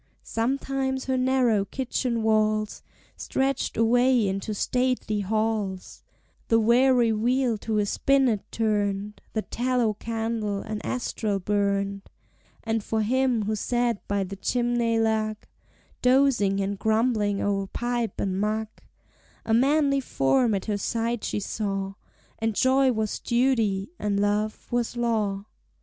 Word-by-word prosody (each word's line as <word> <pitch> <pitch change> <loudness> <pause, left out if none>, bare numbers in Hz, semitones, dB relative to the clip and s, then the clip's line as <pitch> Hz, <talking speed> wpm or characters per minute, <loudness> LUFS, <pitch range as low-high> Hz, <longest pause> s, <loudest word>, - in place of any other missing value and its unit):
Sometimes 265 +2 -1
her 260 - 0
narrow 255 -5 +2
kitchen 240 0 -2
walls 215 -1 +1 0.3
Stretched 270 0 -1
away 245 0 +3
into 195 +3 -3
stately 250 -2 0
halls; 210 -2 -2 0.5
The 225 - +4
weary 240 +1 +4
wheel 240 +2 +1
to 220 0 -2
a 210 - +2
spinnet 260 -1 +1
turned, 205 -2 -1
The 220 - -1
tallow 245 -2 0
candle 225 -2 -3
an 215 -1 -5
astral 220 -4 -2
burned; 200 0 0 0.6
And 225 -1 -1
for 220 +1 -1
him 250 0 +1
who 215 +1 -1
sat 240 0 -1
by 200 -1 0
the 195 +1 -6
chimney 240 +1 0
lug, 220 -1 0 0.6
Dozing 250 -7 +3
and 195 0 -2
grumbling 220 -2 +1
o'er 195 -1 -1
pipe 240 +1 -2
and 190 0 -1
mug, 215 +1 -1 0.8
A 225 - 0
manly 275 +3 +3
form 235 - +1
at 195 - -3
her 210 -2 -1
side 230 +2 -2
she - - -2
saw, 195 -1 -3 0.5
And 225 -1 -1
joy 260 +2 +4
was 220 -3 -2
duty 235 -4 +1
and 205 -1 0
love 210 +1 0
was 240 0 -1
law. 215 -4 0
225 Hz, 130 wpm, -26 LUFS, 205-245 Hz, 0.8 s, The